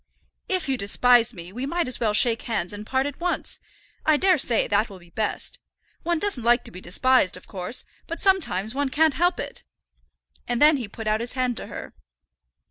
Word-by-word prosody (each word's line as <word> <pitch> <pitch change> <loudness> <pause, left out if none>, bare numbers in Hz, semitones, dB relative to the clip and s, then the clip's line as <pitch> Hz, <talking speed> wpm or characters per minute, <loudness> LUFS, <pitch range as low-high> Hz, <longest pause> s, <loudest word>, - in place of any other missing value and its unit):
"If 370 -5 0
you 265 -1 0
despise 240 +3 +4
me, 180 -4 -10
we 250 +4 -4
might 345 +1 -1
as 255 - 0
well 220 -3 +1
shake 230 +1 +5
hands 205 -5 -2
and 210 +1 -8
part 265 0 0
at 285 -1 -5
once. 355 0 -2 0.4
I 310 -1 +4
daresay 300 - +3
that 210 +2 +1
will 195 - -11
be 175 -1 -19
best. 215 +2 -3 0.4
One 340 0 0
doesn't 315 - 0
like 240 +1 +3
to - - -7
be 185 - -10
despised, 190 +2 +2
of 180 - -13
course; 190 +5 -4 0.2
but 335 - -5
sometimes 245 - +1
one 280 0 -1
can't 310 +3 +3
help 350 +3 +1
it." - - -6 0.8
And 240 -1 0
then 300 0 +6
he 240 -5 -5
put 220 +2 -9
out 215 +1 +1
his 235 - -3
hand 255 -2 0
to - - -3
her. - - -8
245 Hz, 205 wpm, -24 LUFS, 210-295 Hz, 0.8 s, then